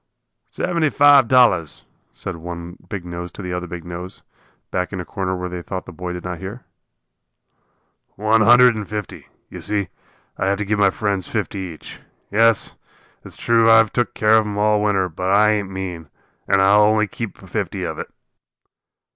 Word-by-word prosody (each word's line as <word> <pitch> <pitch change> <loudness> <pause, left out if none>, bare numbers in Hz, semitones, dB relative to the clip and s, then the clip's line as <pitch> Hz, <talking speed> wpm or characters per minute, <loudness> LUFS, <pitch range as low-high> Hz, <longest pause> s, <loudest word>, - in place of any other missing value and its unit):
"Seventy 170 -4 0
five 145 -2 +6
dollars," 115 - +3 0.3
said 95 -3 -7
one 85 +1 -8
big 95 -5 -5
nose 85 0 -6
to - - -9
the 90 -1 -4
other 90 0 -4
big 85 0 -8
nose, 90 +1 -8 0.5
back 90 0 -2
in 95 - -5
a 90 - -5
corner 95 0 -3
where 90 0 -4
they 90 0 -6
thought 90 +1 -6
the - - -10
boy 90 +2 -6
did 90 0 -6
not 90 -2 -5
hear. 100 +6 -8 1.5
"One 110 +2 +2
hundred 120 +2 +7
and 105 -2 -5
fifty. 105 -2 -6 0.2
You - - -8
see, 100 -4 -2 0.5
I'll 95 - 0
have 100 0 +1
to 105 - -3
give 105 +1 -1
my 100 -1 +5
friends 100 -2 -2
fifty 105 -2 -3
each. 90 -4 -8 0.3
Yes, 115 +1 +2 0.5
it's - - -12
true 115 -1 +3
I've 115 -1 +5
took 120 -1 -1
care 110 +1 +4
of 110 - -2
'em 105 -1 -5
all 105 0 +2
winter, 100 -3 +1
but 90 +2 -4
I 105 +2 +5
ain't 105 -3 -1
mean, 90 -5 -6 0.4
and 95 0 +3
I'll 100 +2 +5
only 110 +1 +3
keep 115 +2 -7
fifty - - -4
of - - -4
it." - - -6
100 Hz, 185 wpm, -20 LUFS, 90-110 Hz, 1.5 s, hundred